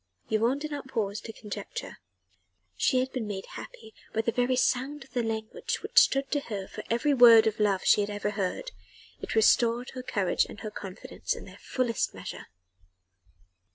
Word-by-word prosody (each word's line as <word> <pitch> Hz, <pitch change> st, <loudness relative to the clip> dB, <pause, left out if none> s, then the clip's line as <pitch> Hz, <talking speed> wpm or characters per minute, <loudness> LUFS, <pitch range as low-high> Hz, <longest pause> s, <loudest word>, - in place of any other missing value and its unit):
Yvonne 230 Hz, +5 st, +2 dB
did 305 Hz, +1 st, -5 dB
not 285 Hz, -2 st, -5 dB
pause 215 Hz, -5 st, -2 dB
to 225 Hz, -, -7 dB
conjecture: 210 Hz, -2 st, -7 dB, 0.8 s
she 255 Hz, -, +2 dB
had 260 Hz, +1 st, -3 dB
been 240 Hz, -5 st, -3 dB
made 195 Hz, -2 st, -5 dB
happy 220 Hz, -1 st, -10 dB, 0.2 s
by 225 Hz, -, +1 dB
the 230 Hz, -, 0 dB
very 245 Hz, +2 st, +1 dB
sound 265 Hz, +3 st, 0 dB
of 260 Hz, -, -22 dB
the 245 Hz, -1 st, 0 dB
language 220 Hz, -1 st, -3 dB
which -, -, +5 dB
stood 275 Hz, 0 st, +2 dB
to 290 Hz, -, +2 dB
her 205 Hz, -8 st, -5 dB
for -, -, -8 dB
every 260 Hz, +6 st, +2 dB
word 235 Hz, -3 st, +8 dB
of 220 Hz, -1 st, 0 dB
love 200 Hz, -3 st, +2 dB
she -, -, +5 dB
had 205 Hz, -, -2 dB
ever 205 Hz, 0 st, -2 dB
heard: 195 Hz, -3 st, -3 dB, 0.5 s
it -, -, -4 dB
restored 235 Hz, +2 st, +3 dB
her 255 Hz, -, -6 dB
courage 200 Hz, -7 st, +1 dB
and -, -, -11 dB
her 215 Hz, -, -5 dB
confidence 195 Hz, -2 st, -5 dB
in -, -, -9 dB
their -, -, -13 dB
fullest 245 Hz, -4 st, -1 dB
measure. -, -, -8 dB
225 Hz, 185 wpm, -28 LUFS, 210-255 Hz, 0.8 s, word